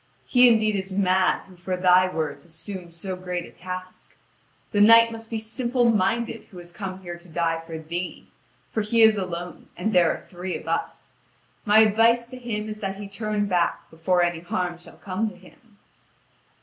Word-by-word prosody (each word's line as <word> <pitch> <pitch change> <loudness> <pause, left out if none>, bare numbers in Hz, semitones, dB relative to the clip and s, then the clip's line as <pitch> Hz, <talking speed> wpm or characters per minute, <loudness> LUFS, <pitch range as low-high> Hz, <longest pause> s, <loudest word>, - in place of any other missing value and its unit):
He 250 -1 +6
indeed 215 -2 +3
is 190 0 -4
mad 185 -1 +2
who 185 - -17
for 180 +1 -4
thy 185 0 +5
words 160 -4 -3
assumes 170 +1 -8
so 185 +2 -4
great 180 -1 -4
a - - -13
task. 185 0 -9 0.5
The 205 - +2
knight 230 +2 +7
must 225 0 -9
be 225 - -2
simple 240 +2 +1
minded 225 +3 0
who 185 - -15
has 175 0 -10
come 190 +1 -7
here 175 -1 -7
to 175 - -15
die 165 0 0
for 165 0 -8
thee, 170 +3 -5 0.4
for 220 - 0
he 225 +2 +3
is 220 -1 +7
alone 175 -1 -6
and 215 +5 -1
there 175 -2 +5
are - - -6
three 180 0 -5
of - - -13
us. - - -3 0.5
My 215 +1 +6
advice 230 +2 +3
to 255 - -8
him 215 -3 -4
is 215 0 -6
that 195 -2 -3
he 200 0 -7
turn 210 +1 -2
back 180 -3 -1
before 175 +2 +1
any 175 -1 0
harm 175 0 -3
shall 175 - -14
come 200 +3 -2
to 195 - -14
him." 205 +4 -20
190 Hz, 190 wpm, -24 LUFS, 175-220 Hz, 0.5 s, knight